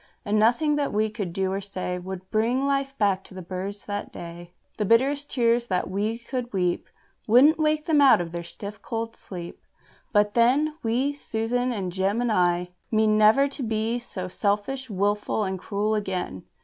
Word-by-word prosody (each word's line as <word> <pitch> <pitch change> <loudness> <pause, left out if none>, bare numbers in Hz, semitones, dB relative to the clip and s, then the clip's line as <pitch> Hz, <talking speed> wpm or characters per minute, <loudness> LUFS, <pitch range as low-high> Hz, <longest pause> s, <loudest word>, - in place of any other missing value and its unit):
And 210 +1 +2
nothing 270 +7 +3
that 285 -1 0
we 215 +1 +1
could 205 -5 -4
do 190 +2 -1
or 195 - -2
say 185 -2 -4
Would 185 +1 -8
bring 240 +5 +1
life 275 -1 -1
back 195 -3 +2
to - - -13
the 185 - -7
birds 190 +3 -5
that 205 0 -4
day. 170 0 -9 0.3
The - - +2
bitterest 275 +7 +2
tears 235 -1 +2
that 185 -2 -1
we 210 +4 -1
could 240 +1 -5
weep 180 -3 0 0.4
Wouldn't 270 +9 +6
wake 305 0 +1
them 310 -4 +4
out 275 -8 +7
of 170 -1 -4
their 170 0 -4
stiff 200 +4 -8
cold 230 -1 -4
sleep. 175 -3 -8 0.5
But 205 -1 +3
then, 275 +6 +3
We 250 +5 0
Susan 245 -1 -1
and 195 -6 -3
Jem 195 +4 0
and 240 -1 +1
I 180 -2 +1 0.2
mean 215 -1 +3
never 215 +6 +5
to 275 - -6
be 225 0 -1
so 185 -6 -5
selfish, 210 +8 -1
and 200 - -6
wilful, 205 +2 +1
and 190 -1 -3
cruel 210 +3 -1
again. 185 - -3
215 Hz, 190 wpm, -25 LUFS, 190-245 Hz, 0.5 s, out